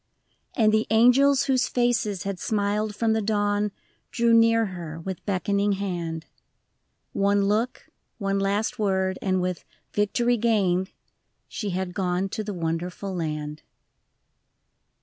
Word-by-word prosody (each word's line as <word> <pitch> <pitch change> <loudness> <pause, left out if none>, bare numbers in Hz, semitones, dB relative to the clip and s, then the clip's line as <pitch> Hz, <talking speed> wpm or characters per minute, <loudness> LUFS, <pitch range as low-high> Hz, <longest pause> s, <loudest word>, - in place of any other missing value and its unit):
And 215 -3 +4
the 220 0 +2
angels 250 +5 +5
whose 255 -2 +2
faces 240 -6 0
had 195 -2 -4
smiled 210 +1 -1
from 225 +1 +1
the 220 - +1
dawn 205 0 0 0.4
Drew 235 -1 +2
near 230 0 +5
her 170 -5 -7
with 190 +2 -6
beckoning 200 +2 +1
hand; 170 -5 -4 0.9
One 200 0 +2
look, 220 +5 -1 0.3
one 195 -2 -1
last 205 +5 -1
word, 190 -2 0
and 185 -2 0
with 180 -1 -3 0.2
" - - -46
Victory 235 +4 +1
gained 195 -5 +1 0.2
" - - -50
— - - -49
She 210 - -4
had 185 -1 -3
gone 185 0 -1
to 215 - -4
the 210 - -4
Wonderful 175 +2 -3
Land. 150 -3 -4
200 Hz, 140 wpm, -25 LUFS, 185-220 Hz, 0.9 s, angels